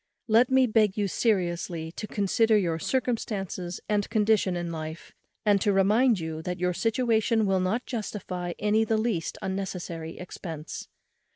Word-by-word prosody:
Let 230 +2 +5
me 260 0 +5
beg 215 -4 +2
you 205 -1 +1
seriously 175 -6 -1
to 215 - -6
consider 215 +2 +2
your 170 -5 0
circumstances 200 -7 -2
and 205 -1 0
condition 210 -4 +2
in 175 -1 -3
life, 160 0 -7 0.3
and 205 -2 +4
to 210 - +3
remember 195 -5 +2
that 180 +2 -4
your 180 0 +1
situation 225 +1 +2
will 195 -1 +2
not 200 +7 0
justify 185 -6 -4
any 210 +1 +2
the 220 0 +1
least 215 -7 -1
unnecessary 180 -4 -4
expence. 165 -3 -7
195 Hz, 145 wpm, -27 LUFS, 175-220 Hz, 0.3 s, Let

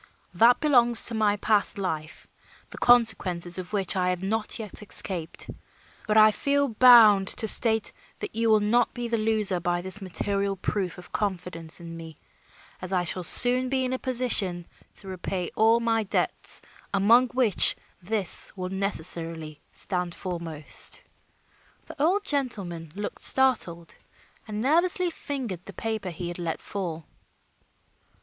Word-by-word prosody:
That 230 +7 +4
belongs 240 -6 +3
to 235 - 0
my 210 -2 +1
past 210 +1 +1
life, 160 -5 -5 0.5
the - - -10
consequences 185 -7 +2
of 180 +1 -8
which 200 -2 -1
I 180 -1 0
have 180 0 -3
not 215 +2 -2
yet 215 -3 -7
escaped, 180 -5 -3 0.6
but 215 0 +1
I 215 0 +7
feel 280 +4 0
bound 220 -4 +6
to 220 - -2
state 220 -1 -1 0.3
that - - -7
you 225 +1 0
will 215 -1 +4
not 225 +4 +1
be 240 -1 -4
the 230 -1 -1
loser 215 -4 0
by 175 0 -2
this 190 +3 0
material 195 +1 -1
proof 190 -1 -4
of 180 - -13
confidence 180 -5 -5
in 170 -1 -10
me, 160 -2 -11 0.6
as 185 0 -6
I 180 -2 0
shall 180 +2 -1
soon 250 +8 +6
be 260 -1 0
in 255 - -3
a 260 - -3
position 225 -9 +1 0.3
to 195 - -3
repay 185 -1 -5
all 225 +2 +3
my 230 -1 0
debts, 205 - -1 0.3
among 225 +6 +4
which 245 -5 +5 0.3
this 195 0 +2
will 185 0 -5
necessarily 165 -5 -1
stand 180 -2 -2
foremost." 165 -5 -3 0.9
The 280 - -9
old 375 +7 +1
gentleman 200 - -2
looked 205 +1 -6
startled 200 -11 +1 0.5
and 210 0 -5
nervously 345 +6 +1
fingered 255 - -6
the 200 - -10
paper 220 -3 -4
he 175 +1 -7
had 175 - -8
let 165 -2 -4
fall. 170 -6 -6
205 Hz, 150 wpm, -25 LUFS, 180-235 Hz, 0.9 s, I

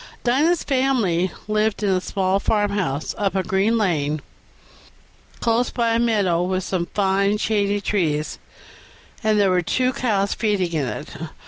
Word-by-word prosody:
Dinah's 300 +8 +2
family 235 - +1 0.2
lived 215 0 0
in 205 - +2
a 185 -1 +1
small 190 0 0
farmhouse, 200 -9 -1
up 195 -2 0
a 190 - +1
green 195 +5 +1
lane, 155 -8 0 1.2
close 235 +1 +1
by 235 -2 0
a 230 - +2
meadow 205 -7 +2
with 185 +1 -1
some 175 -2 -2
fine 200 +1 +2
shady 205 -1 0
trees; 160 -7 -1 0.8
there 210 -4 +3
were 180 -1 +3
two 255 +9 0
cows 200 -6 0
feeding 200 -6 0
in 150 -5 0
it. 105 - -5
200 Hz, 140 wpm, -22 LUFS, 185-220 Hz, 1.2 s, there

